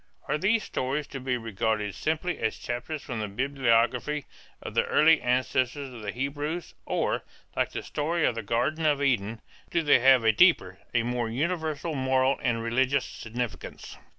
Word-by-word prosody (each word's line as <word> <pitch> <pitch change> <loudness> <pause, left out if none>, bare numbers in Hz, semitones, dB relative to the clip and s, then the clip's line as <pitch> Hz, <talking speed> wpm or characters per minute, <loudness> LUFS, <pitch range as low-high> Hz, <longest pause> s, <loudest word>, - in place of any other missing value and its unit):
Are 150 - 0
these 210 +5 +2
stories 140 +3 -2
to 135 - -6
be 130 -1 -1
regarded 110 -2 -1
simply 160 +3 -2
as 110 - -1
chapters 125 +5 -4
from 120 -3 -4
the 105 - -2
biography 125 +3 +1 0.3
of - - -7
the - - +3
early 160 +1 +5
ancestor 130 +2 0
of 125 -4 -9
the 105 -1 -3
Hebrews 145 +7 -3
or, - - 0 0.3
like - - +1
the - - -5
story 160 +2 -1
of - - +2
the 115 - -4
Garden 120 +10 0
of 150 -2 +3
Eden, 115 -4 0 0.3
do 170 - +1
they 145 - +5
have 130 -1 +6
a 110 - +5
deeper, 105 - +4
a 120 -1 +2
more 120 -1 -1
universal 160 +4 -2
moral 130 -1 +2
and 115 -1 0
religious 130 +4 +1
significance? 120 -1 -6
130 Hz, 170 wpm, -27 LUFS, 115-150 Hz, 0.3 s, have